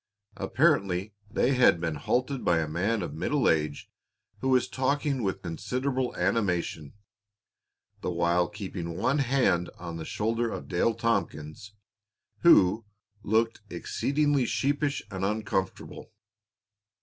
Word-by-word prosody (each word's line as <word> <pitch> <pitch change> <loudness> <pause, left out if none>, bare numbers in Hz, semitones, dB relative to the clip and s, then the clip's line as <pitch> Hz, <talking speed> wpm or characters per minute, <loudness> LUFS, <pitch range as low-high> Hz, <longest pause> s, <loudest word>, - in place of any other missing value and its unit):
Apparently 95 +2 +1 0.2
they 130 +5 +2
had 125 -9 +5
been 85 -1 -1
halted 125 - -1
by 85 -1 +3
a 80 -1 0
man 95 +7 0
of 75 - -5
middle 140 - 0
age 75 -2 0 0.5
who 130 - -1
was 130 -1 +3
talking 140 +1 0
with 95 -3 -2
considerable 125 +9 -2
animation, 90 -8 -1 1.1
the - - -2
while 85 0 +2
keeping 95 -5 -6
one 135 +9 +1
hand 125 -10 +2
on 85 -1 -6
the 80 - -5
shoulder 115 +2 -1
of - - -6
Dale 95 +6 +1
Tompkins, 105 -5 -2 0.7
who 110 - +5 0.4
looked 115 +2 +1
exceedingly 145 -3 0
sheepish 145 +3 0
and 95 -1 -4
uncomfortable. 100 -2 -3
105 Hz, 120 wpm, -28 LUFS, 85-130 Hz, 1.1 s, had